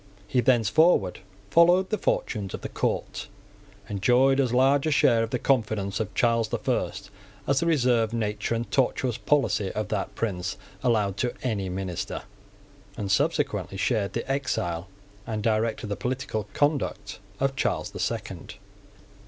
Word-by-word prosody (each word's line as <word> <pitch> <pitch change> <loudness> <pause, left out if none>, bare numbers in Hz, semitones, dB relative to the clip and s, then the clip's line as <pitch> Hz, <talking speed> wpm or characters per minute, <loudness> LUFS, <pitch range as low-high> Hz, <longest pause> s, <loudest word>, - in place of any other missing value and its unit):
He 125 +4 +2
thenceforward 120 - +3 0.3
followed 175 +3 +5
the 215 - +1
fortunes 100 -4 -1
of - - -9
the - - -5
court, - - -2 0.6
enjoyed 125 +7 +3
as 130 -3 +2
large 135 +4 +3
a - - +1
share 120 -5 +4
of 115 - -1
the 125 - -1
confidence 110 -6 0
of 110 - -4
Charles 115 -2 +2
the - - -2
First - - -2 0.3
as 140 0 +2
the 170 - 0
reserved 125 -8 +2
nature 110 0 -1
and 115 +1 -2
tortuous 125 -2 +1
policy 135 -10 +1
of 105 - -3
that 100 -3 -2
prince 95 -6 -2 0.2
allowed 105 -6 +1
to 125 +2 -1
any 105 -7 -1
minister, 90 -2 -4 0.7
and 100 -2 -2
subsequently 105 - 0
shared 105 -2 0
the 115 - -3
exile 95 -11 -1 0.4
and 110 -2 -3
directed 110 0 0
the 105 -1 -3
political 125 -4 -3
conduct 145 - 0 0.2
of 135 0 +1
Charles - - -1
the - - -8
Second. - - -4
115 Hz, 150 wpm, -26 LUFS, 105-135 Hz, 0.7 s, followed